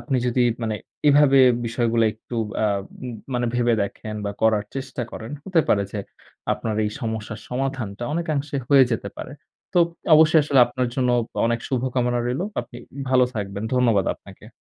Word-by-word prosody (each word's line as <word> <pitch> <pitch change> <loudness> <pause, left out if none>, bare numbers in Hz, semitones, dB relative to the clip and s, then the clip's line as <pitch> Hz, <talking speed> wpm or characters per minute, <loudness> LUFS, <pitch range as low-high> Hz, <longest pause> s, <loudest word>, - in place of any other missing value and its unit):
আপনি 135 -4 -1
যদি 125 0 +2 0.2
মানে 110 -1 -1 0.3
এভাবে 140 -1 +6 0.3
বিষয়গুলো 115 0 +1
একটু 115 +2 -9 0.3
আব 100 -2 +1 0.2
ম - - -4 0.2
মানে 120 0 0
ভেবে 120 -1 +2
দেখেন 105 +2 -5
বা 100 - -1
করার 110 -2 +3
চেষ্টা 130 -2 -4
করেন 110 +3 -8
হতে 180 -4 +3
পারে 100 - +3
যে 105 - -3 0.5
আপনার 110 -1 -3
এই 105 - -1
সমস্যার 110 -2 -4
সমাধানটা 125 -4 -3
অনেকাংশে 150 -4 -2
হয়ে 135 -2 +7
যেতে 115 - -2
পারে। - - -7 0.4
তোপ 170 -1 +5 0.3
অবশ্যই 155 +1 +6
আসলে 140 -2 +2
আপনার 125 0 -2
জন্য 125 -2 +1 0.4
অনেক 120 0 0
শুভকামনা 125 -2 0
রইল। 125 +5 -1 0.2
আপনি 120 - -12 0.3
ভালো 130 -1 +5
থাকবেন। 100 -1 -4
ধন্যবাদ 115 -6 +3
আপনাকে। - - -15
120 Hz, 160 wpm, -23 LUFS, 110-135 Hz, 0.5 s, হয়ে